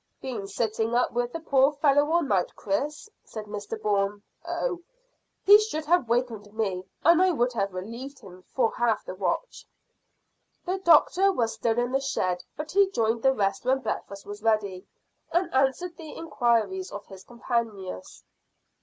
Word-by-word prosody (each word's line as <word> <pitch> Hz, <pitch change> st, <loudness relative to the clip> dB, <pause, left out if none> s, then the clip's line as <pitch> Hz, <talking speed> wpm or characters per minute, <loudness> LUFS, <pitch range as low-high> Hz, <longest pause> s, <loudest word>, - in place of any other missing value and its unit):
"Been 230 Hz, -7 st, -5 dB
sitting 220 Hz, +3 st, -1 dB
up 245 Hz, -, +2 dB
with 245 Hz, 0 st, -1 dB
the 330 Hz, -, -5 dB
poor 275 Hz, -2 st, +3 dB
fellow 290 Hz, 0 st, +3 dB
all 340 Hz, +1 st, +3 dB
night, 195 Hz, -10 st, 0 dB
Chris?" 285 Hz, -, -2 dB, 0.2 s
said 215 Hz, -2 st, -8 dB
Mr 210 Hz, +1 st, -6 dB
Bourne. 205 Hz, -1 st, 0 dB, 0.2 s
"Oh, 360 Hz, -9 st, -2 dB, 0.6 s
he 410 Hz, +1 st, +9 dB
should 425 Hz, -8 st, -3 dB
have 325 Hz, -7 st, +2 dB
wakened 230 Hz, -4 st, -1 dB
me, 190 Hz, -4 st, -2 dB, 0.2 s
and 340 Hz, +2 st, +6 dB
I 370 Hz, -, +5 dB
would 250 Hz, -7 st, +1 dB
have 200 Hz, -4 st, -1 dB
relieved 235 Hz, +9 st, -7 dB
him 185 Hz, -6 st, -13 dB
for 225 Hz, +4 st, 0 dB
half 235 Hz, -3 st, +1 dB
the -, -, -6 dB
watch." 195 Hz, -, -3 dB, 1.0 s
The 375 Hz, +1 st, -1 dB
doctor 375 Hz, +3 st, +5 dB
was 230 Hz, -10 st, 0 dB
still 225 Hz, -1 st, -1 dB
in 245 Hz, +1 st, 0 dB
the 270 Hz, -, +2 dB
shed, 185 Hz, -9 st, -1 dB
but 305 Hz, +1 st, -5 dB
he 395 Hz, 0 st, +4 dB
joined 230 Hz, -, 0 dB
the 265 Hz, -, +5 dB
rest 195 Hz, -3 st, 0 dB
when 260 Hz, +2 st, +1 dB
breakfast 200 Hz, -3 st, -5 dB
was 205 Hz, +1 st, -8 dB
ready, 210 Hz, -4 st, 0 dB, 0.4 s
and 345 Hz, 0 st, 0 dB
answered 275 Hz, +7 st, +1 dB
the 320 Hz, -2 st, -9 dB
inquiries 310 Hz, -, 0 dB
of 205 Hz, -, -7 dB
his 190 Hz, -1 st, -12 dB
companions. 230 Hz, -, -4 dB
240 Hz, 165 wpm, -26 LUFS, 205-300 Hz, 1.0 s, he